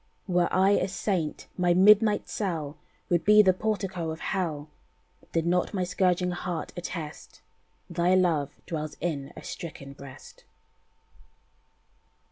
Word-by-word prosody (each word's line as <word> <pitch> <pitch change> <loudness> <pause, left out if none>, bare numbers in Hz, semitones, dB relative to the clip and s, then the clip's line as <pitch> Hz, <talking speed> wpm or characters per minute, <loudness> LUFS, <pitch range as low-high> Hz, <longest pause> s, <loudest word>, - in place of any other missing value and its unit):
"Were 175 -2 +2
I 190 +1 +4
a 200 - +2
saint, 185 -4 -2
my 175 -1 +3
midnight 210 +3 +5
cell 160 -8 -3 0.3
Would 175 -1 +2
be 210 0 +7
the 190 -2 +5
portico 190 -4 -2
of 160 0 -5
hell, 160 -6 -2 0.6
Did 165 -1 0
not 180 +4 +1
my 185 - 0
scourging 180 0 +1
heart 175 -1 -4
attest 170 -3 -7 0.5
Thy 175 +1 +2
love 165 -6 +2 0.2
dwells 155 -2 -4
in 145 -5 -3
a - - -9
stricken 140 -5 -7
breast." 140 -1 -13
175 Hz, 125 wpm, -27 LUFS, 160-190 Hz, 0.6 s, be